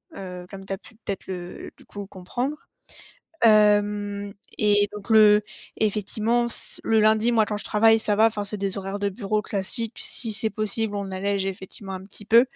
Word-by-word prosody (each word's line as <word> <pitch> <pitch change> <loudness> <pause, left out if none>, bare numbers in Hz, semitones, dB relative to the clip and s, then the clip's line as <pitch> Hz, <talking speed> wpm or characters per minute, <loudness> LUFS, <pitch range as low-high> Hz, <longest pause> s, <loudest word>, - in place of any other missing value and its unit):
Heu, 180 -2 -8
comme 195 -1 -9
tu 195 - -4
as 195 - -5
pu, 225 - -18
peut-être, 200 -3 -6
le 180 -1 -7
du - - -19
coup, 205 -1 -8
comprendre. 245 +10 -4 0.9
Hem, 205 -1 +3 0.2
et 205 -1 +3
donc 210 +1 -9
le 210 -1 +7 0.3
effectivement, 215 +3 0
ce - - -3
le 225 -1 +3
lundi, 220 +2 +3
moi, 225 -2 +4
quand 210 0 -3
je 205 - -4
travaille, 225 +1 +4
ça 215 -1 0
va, 220 +2 +5
enfin, 215 -2 -1
c'est 205 +1 -3
des 195 0 -2
horaires 195 +1 -5
de 200 - +1
bureau 210 +1 -2
classiques. 215 +4 -1
Si 230 - 0
c'est 220 +1 0
possible, 215 0 -2
on 200 -1 -4
allège 195 +1 -1
effectivement, 195 +1 -6
un 190 0 -7
petit 205 +1 -7
peu. 230 +3 +6
205 Hz, 190 wpm, -24 LUFS, 195-220 Hz, 0.9 s, le